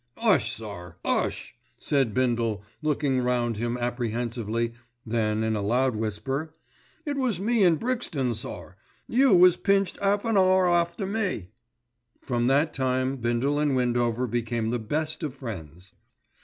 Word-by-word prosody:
"'Ush, 225 -4 +3
sir, 100 -5 -7
'ush!" - - -1 0.2
said 135 -6 +1
Bindle 115 -4 0 0.2
looking 145 -3 +1
round 120 -2 0
him 120 +2 -2
apprehensively, 115 -1 -2 0.3
then 110 -1 0
in 110 0 0
a 105 - -1
loud 125 +4 +1
whisper, 135 +8 -3 0.5
"It 290 -2 -2
was 255 -8 +1
in 200 -5 +3
Brixton, 165 - -1
sir. 90 -5 -6 0.3
You 255 -3 +4
was 180 0 +6
pinched 195 -1 +1
'alf 200 +1 +1
an 225 -2 +2
'our 185 -1 +4
after 175 +3 +1
me." 195 - -2 0.7
From 120 -2 -1
that 145 +4 +2
time 130 0 0
Bindle 120 +4 0
and 145 -2 +1
Windover 120 -1 +1
became 115 -1 -2
the 120 - -1
best 155 +9 -2
of 150 -5 -4
friends. 95 - -8
125 Hz, 140 wpm, -26 LUFS, 115-170 Hz, 0.7 s, was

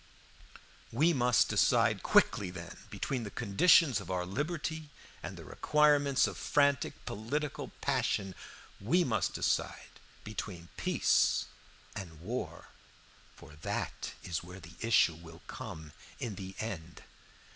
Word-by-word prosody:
"We 155 +9 +3
must 125 -4 +4
decide - - +3
quickly, 95 - +3
then, 85 -2 -8
between 130 -3 -2
the 110 - -5
conditions 130 - +4
of 90 - -10
our 90 -1 -1
liberty 155 - -3 0.3
and - - -7
the - - -10
requirements 145 -2 +3
of - - -4
frantic 140 -2 +1
political 140 +8 -3
passion. 95 -2 0 0.5
We 170 - +3
must 115 -8 0
decide - - -1 0.2
between 90 -6 -6
peace - - +2 0.5
and 80 -5 -7
war, 115 +10 -5 0.7
for 75 - -14
that - - -3
is 85 - -2
where 90 +2 -10
the 85 0 -12
issue 115 -7 +4
will 80 +1 -13
come 85 -11 -8 0.3
in 120 -6 -3
the 95 0 -8
end. 85 -7 -6
110 Hz, 125 wpm, -32 LUFS, 90-140 Hz, 0.7 s, must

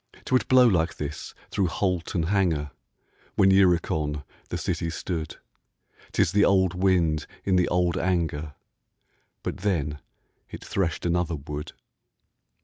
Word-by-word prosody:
'Twould 130 0 +1
blow 130 -1 +6
like 85 -7 +2
this 75 0 -6 0.2
through 100 -3 +1
holt 90 0 -1
and 85 -2 +1
hanger 85 -8 +1 0.6
When 95 0 +5
Uricon 85 -6 +2 0.3
the - - -2
city 85 - -2
stood: 80 -1 -4 0.8
'Tis - - +2
the 105 0 +4
old 95 -2 +3
wind 90 -5 +1 0.2
in 95 - +2
the 90 -1 +3
old 90 -1 +1
anger, 80 -5 -1 0.9
But - - -3
then 75 -7 -1 0.5
it - - -9
threshed 85 -5 -1
another 85 -1 0
wood. 75 +1 -6
85 Hz, 130 wpm, -26 LUFS, 80-95 Hz, 0.9 s, blow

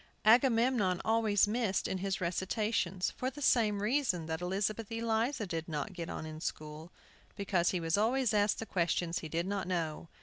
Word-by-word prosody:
Agamemnon 230 -5 +4
always 220 -2 +3
missed 215 -3 0
in 190 - -2
his 195 0 -2
recitations, 185 +1 -1
for 255 - -3
the 270 +3 -11
same 215 -7 +2
reason 215 - +1
that 160 +1 -4
Elizabeth 200 +4 -2
Eliza 225 +2 0
did 165 -2 -4
not 155 +5 -3
get 170 -2 -6
on - - -5
in 155 0 -8
school, 155 +2 -6 0.4
because 185 -3 +1
he 180 - -1
was 165 +3 0
always 245 +2 +2
asked 205 0 +2
the 225 - -5
questions 170 -2 0
he 160 - -7
did 170 +3 -1
not 195 -2 -2
know. 165 -3 -2
195 Hz, 175 wpm, -32 LUFS, 170-225 Hz, 0.4 s, Agamemnon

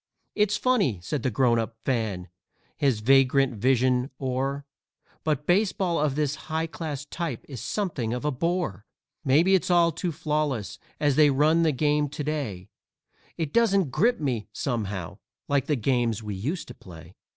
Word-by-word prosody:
"It's 210 0 +2
funny," 210 - +1
said 140 +10 -2
the 130 - 0
Grown 120 0 +2
up 115 0 -4
Fan, 110 -8 -1 0.5
his 135 -8 +1
vagrant 135 +2 +4
vision 125 +3 +2
o'er, 135 +2 -2 0.6
"But 150 -2 -1
baseball 185 -2 +1
of 145 -2 +1
this 150 -2 0 0.2
high 160 +1 0
class 155 -4 -5
type 155 -5 -5
is 130 -6 -7
something 140 - -2
of 125 +4 -3
a 150 - +2
bore. 150 - -2 0.4
Maybe 160 +7 +4
it's 190 - +2
all 170 -1 +4
too 170 +3 -3
flawless 150 - -2 0.2
as 145 -3 +2
they 150 -1 +6
run 150 +4 +3
the 160 -2 +3
game 150 +1 +1
to 150 - -5
day 135 -12 -4 0.7
It 160 -4 -3
doesn't 200 - +3
grip 240 - +2
me, 125 -8 -2
somehow, 105 -9 -3 0.3
like 140 -2 +1
the 150 - +2
games 120 -3 0
we 105 -1 -4
used 140 - -3
to - - -7
play." 85 -5 -13
140 Hz, 160 wpm, -26 LUFS, 120-160 Hz, 0.7 s, they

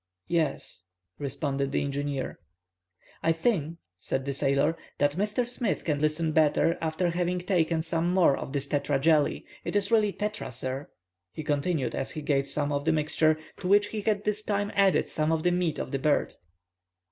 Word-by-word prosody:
"Yes," 160 - -1 0.3
responded 140 -1 -2
the - - 0
engineer. 140 -1 -3 0.8
"I 165 - +3
think," 165 -2 0 0.2
said 135 +6 -2
the 140 - -1
sailor, 140 +3 +2 0.2
"that 145 0 +3
Mr. 210 - -1
Smith 240 -3 -1
can 150 -3 0
listen 155 +2 +1
better 155 +2 +3
after 165 +2 0
having 175 +1 0
taken 170 -3 +1
some 165 +1 0
more 180 -7 +4
of - - -6
this 140 -1 -2
tetra 145 -1 0
jelly,—it 155 +5 +1
is 205 0 +1
really 215 -3 +4
tetra, 210 -4 -4
sir," 130 +3 -4 0.4
he 155 - -6
continued, 145 -2 0
as - - -2
he 155 - -4
gave 140 -2 +1
him - - -13
some 145 +1 -1
of 145 0 -1
the 160 - +4
mixture, 155 0 +2 0.2
to 180 - -5
which 205 +2 +4
he 215 - -3
had 205 -1 0
this 210 0 0
time 205 -1 -1
added 195 -2 +3
some 155 +1 0
of 160 -1 0
the 175 - +3
meat 175 -3 0
of - - -4
the 135 - -1
bird. 145 +2 +1
160 Hz, 180 wpm, -28 LUFS, 145-180 Hz, 0.8 s, more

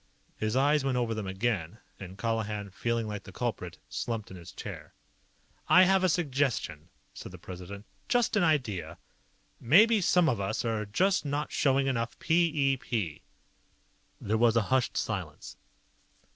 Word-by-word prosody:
His 110 +1 -2
eyes 145 +2 +3
went 135 -2 0
over 120 -2 0
them 110 -3 -4
again, 95 -2 -2 0.2
and 95 -1 -9
Colihan, 105 -2 -2
feeling 115 +3 -1
like 105 -1 -5
the - - -12
culprit, - - -4
slumped 115 -4 -4
in - - -8
his 85 0 -11
chair. - - -9 0.7
"I 180 - +8
have 190 0 +3
a 185 - +4
suggestion," 135 - -1 0.2
said - - -9
the - - -10
President. 95 +3 -9 0.2
"Just 245 -3 +2
an 205 - +3
idea. 105 - 0 0.6
Maybe 205 - +5
some 180 -1 +3
of 115 -9 0
us 95 +4 -2 0.3
just 190 - +2
aren't 145 +1 -2
showing 135 -1 +2
enough 120 -3 -2
p 170 +2 +3 0.3
e - - -2
p." 100 -12 -3 1.0
There 110 +2 -1
was 120 -1 +4
a 115 - +4
hushed 130 -2 +1
silence. - - -4
115 Hz, 155 wpm, -29 LUFS, 100-150 Hz, 1.0 s, I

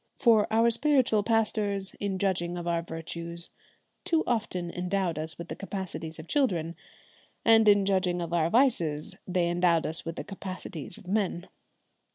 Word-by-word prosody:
For 225 -4 +4
our 230 +1 +4
spiritual 255 -4 +3
pastors, 210 -3 0
in 200 -2 -2
judging 180 -3 -1
of 175 0 -5
our 170 -1 +1
virtues, 170 +1 -6 0.5
too 325 -1 +1
often 185 -7 -2
endowed 180 -2 -1
us 160 0 -3
with 170 - -7
the - - -5
capacities 190 -5 -6
of 160 +1 -10
children, 175 - 0 0.7
and 225 -1 +6
in 205 -1 +6
judging 185 -2 +1
of 170 -1 -4
our 165 -1 +2
vices 170 - +2
they 180 -2 +1
endowed 175 -1 +2
us 160 +1 -2
with 165 0 -5
the - - -5
capacities 185 -4 -7
of 210 -4 -15
men. 190 -3 -1
185 Hz, 160 wpm, -28 LUFS, 170-215 Hz, 0.7 s, and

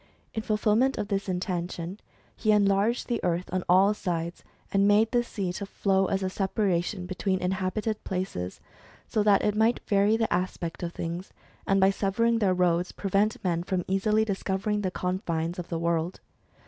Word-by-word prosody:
In 220 - -2
fulfilment 215 +4 +2
of 205 - -3
this 195 -1 -1
intention, 180 0 -3 0.4
he 215 - +1
enlarged 205 +3 +2
the 240 - -2
earth 175 +1 0
on 185 -1 0
all 190 +3 +6
sides; 170 -4 -3 0.3
and 195 0 +3
made 215 +2 +4
the 240 - +3
sea 195 -6 -3
to 200 +2 -5
flow 195 -1 +1
as 195 +1 -1
a - - +1
separation 190 -2 0
between 185 +1 -1
inhabited 190 +4 -2
places, 180 - -4 0.5
so 215 - 0
that 205 -1 +4
it 210 - +2
might 220 +2 +3
vary 205 +2 +3
the 225 -1 0
aspect 175 -2 -2
of 170 -1 -3
things, 170 +2 -5 0.3
and 195 0 +3
by 190 +1 +5
severing 225 +4 +1
their 190 -4 +2
roads, 180 0 +1
prevent 200 +2 0
men 170 -3 0
from 180 0 -2
easily 210 +3 +2
discovering 200 +1 -1
the 190 - 0
confines 180 -2 -2
of 175 - -6
the 170 - -2
world. 170 +1 -1
195 Hz, 175 wpm, -27 LUFS, 180-210 Hz, 0.5 s, all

